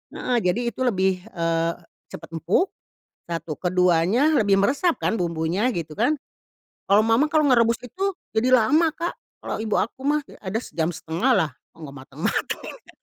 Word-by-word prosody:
heeh, 245 Hz, -1 st, 0 dB
jadi 180 Hz, +4 st, 0 dB
itu -, -, -17 dB
lebih, 190 Hz, -3 st, +1 dB, 0.2 s
eee, 165 Hz, 0 st, 0 dB, 0.3 s
cepat -, -, -11 dB
empuk, 170 Hz, -, 0 dB, 0.6 s
satu. 165 Hz, -2 st, -5 dB
Keduanya 180 Hz, -, +3 dB
lebih 200 Hz, -2 st, +3 dB
meresap 285 Hz, -, +2 dB
kan 220 Hz, -, -1 dB
bumbunya, 170 Hz, +6 st, 0 dB
gitu 160 Hz, -2 st, -4 dB
kan. 300 Hz, -, +1 dB, 0.7 s
Kalau 205 Hz, +2 st, +5 dB
mamah, 230 Hz, +7 st, +3 dB
kalau 310 Hz, 0 st, +2 dB
ngerebus 230 Hz, -1 st, +4 dB
itu 375 Hz, -, -3 dB, 0.3 s
jadi 250 Hz, +4 st, +4 dB
lama 300 Hz, +9 st, +3 dB
Kak. 340 Hz, +1 st, -2 dB, 0.3 s
Kalau -, -, -3 dB
ibu 220 Hz, -1 st, 0 dB
aku 235 Hz, -, -2 dB
mah 300 Hz, +2 st, +2 dB, 0.2 s
ada 195 Hz, +1 st, -4 dB
1.5-lah 165 Hz, -, 0 dB, 0.2 s
enggak 150 Hz, -4 st, -11 dB
mateng -, -, -14 dB
mateng -, -, -2 dB
ini -, -, -9 dB
Kak, -, -, -35 dB
200 Hz, 155 wpm, -23 LUFS, 170-255 Hz, 0.7 s, Kalau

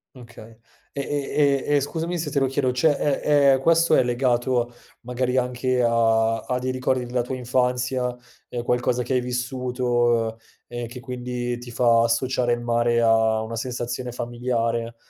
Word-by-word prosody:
Okay. 115 Hz, -2 st, -13 dB, 0.4 s
E 140 Hz, -, -3 dB
e 140 Hz, -1 st, 0 dB
e 145 Hz, -, +2 dB
e -, -, +4 dB
scusami 165 Hz, +5 st, -3 dB
se 155 Hz, -3 st, -4 dB
te 140 Hz, -, +1 dB
lo 135 Hz, -, +2 dB
chiedo, 130 Hz, -1 st, 0 dB
cioè 145 Hz, +4 st, +2 dB
è 145 Hz, -1 st, +3 dB
è 135 Hz, -, +1 dB
questo 165 Hz, +3 st, +3 dB
è -, -, +6 dB
legato, 120 Hz, 0 st, 0 dB, 0.3 s
magari, 125 Hz, +1 st, -2 dB
anche 125 Hz, 0 st, 0 dB
a 115 Hz, -1 st, +2 dB
a 125 Hz, +3 st, -3 dB
dei 130 Hz, +1 st, -2 dB
ricordi 130 Hz, -1 st, -1 dB
della 125 Hz, 0 st, -1 dB
tua 130 Hz, +2 st, -4 dB
infanzia, 125 Hz, 0 st, -1 dB, 0.3 s
ehm, 120 Hz, -1 st, -4 dB
qualcosa 125 Hz, 0 st, 0 dB
che 130 Hz, +2 st, -3 dB
hai 125 Hz, -, +2 dB
vissuto 125 Hz, -2 st, -1 dB, 0.3 s
e 120 Hz, -1 st, -6 dB
che 125 Hz, +2 st, -9 dB
quindi 125 Hz, -1 st, -4 dB
ti 120 Hz, 0 st, -10 dB
fa 115 Hz, -1 st, +3 dB
associare 120 Hz, +1 st, +1 dB
il 120 Hz, -, -3 dB
mare 120 Hz, 0 st, +1 dB
a 110 Hz, -1 st, +3 dB
una 115 Hz, +1 st, -6 dB
sensazione 125 Hz, +1 st, -4 dB
familiare, 120 Hz, -1 st, -2 dB
125 Hz, 165 wpm, -23 LUFS, 120-130 Hz, 0.4 s, è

